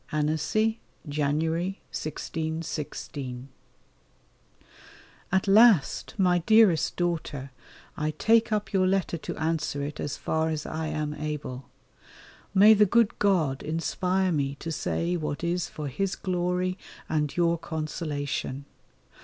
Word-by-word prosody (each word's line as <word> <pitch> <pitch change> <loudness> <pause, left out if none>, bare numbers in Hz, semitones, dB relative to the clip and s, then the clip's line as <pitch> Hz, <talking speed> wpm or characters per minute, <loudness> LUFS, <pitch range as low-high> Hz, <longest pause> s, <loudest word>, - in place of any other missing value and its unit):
ANNECY, 160 +9 +1 0.3
January, 160 +6 -1
1616. 150 -5 -5 1.8
At 190 +2 +2
last, 205 - +5
my 180 -3 +3
dearest 210 -3 +4
daughter, 160 -6 -2 0.4
I 155 0 -1
take 225 +8 +3
up 210 -2 -1
your 185 -1 +3
letter 185 -3 0
to - - -6
answer 155 -3 -1
it 145 +1 -5
as 145 - -3
far 160 0 0
as 155 -1 -3
I 160 0 -3
am 150 -1 -2
able. 150 -4 -5 0.8
May 205 +3 +8
the 210 -1 +5
good 230 +2 +2
God 160 -10 +2
inspire 180 +4 0
me 140 -3 0
to 165 +3 -6
say 170 +3 -1
what 155 -1 -4
is 175 0 -1
for 150 -1 -5
His 195 +8 -2
glory 180 0 -1 0.3
and 150 -1 -1
your 170 -1 +2
consolation. 150 -4 -4
160 Hz, 120 wpm, -27 LUFS, 150-185 Hz, 1.8 s, May